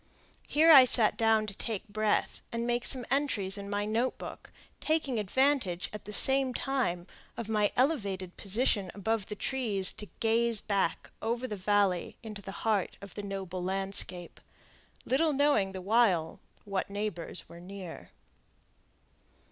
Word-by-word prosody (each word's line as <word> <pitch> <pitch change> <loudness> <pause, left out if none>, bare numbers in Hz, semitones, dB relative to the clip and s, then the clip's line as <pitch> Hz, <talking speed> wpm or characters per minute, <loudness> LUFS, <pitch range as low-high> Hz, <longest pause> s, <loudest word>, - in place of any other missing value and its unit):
Here 320 +3 +5
I 275 -4 +11
sat 230 -3 +6
down 225 -1 +3
to 210 - -6
take 220 0 -5
breath 215 0 -1
and 235 0 -2
make 240 0 +1
some 255 -3 0
entries 225 -9 0
in 200 -1 -5
my 205 0 -1
note 230 +4 -1
book, - - -9 0.3
taking 300 -7 0
advantage, 210 -4 0
at 210 -1 -8
the 210 - -7
same 265 +3 +3
time, 245 -11 -1 0.3
of 235 - -5
my 210 -2 +1
elevated 200 - 0
position 205 -1 0
above 205 +1 -1
the 210 - -5
trees 210 -6 +1
to 210 - -8
gaze 230 0 +2
back 200 -2 -1
over 235 +3 -2
the 215 - -4
valley 195 -2 0
into 215 -2 -7
the 195 - -8
heart 210 -4 0
of 200 -1 -11
the 205 - -6
noble 190 -2 -5
landscape, 190 -2 -3 0.6
little 305 +4 +2
knowing 275 -9 +2
the 190 -1 -7
while 190 -6 +2 0.3
what 195 -1 -3
neighbors 200 -4 -4
were 170 - -12
near. 185 -1 -9
210 Hz, 150 wpm, -30 LUFS, 195-240 Hz, 0.6 s, I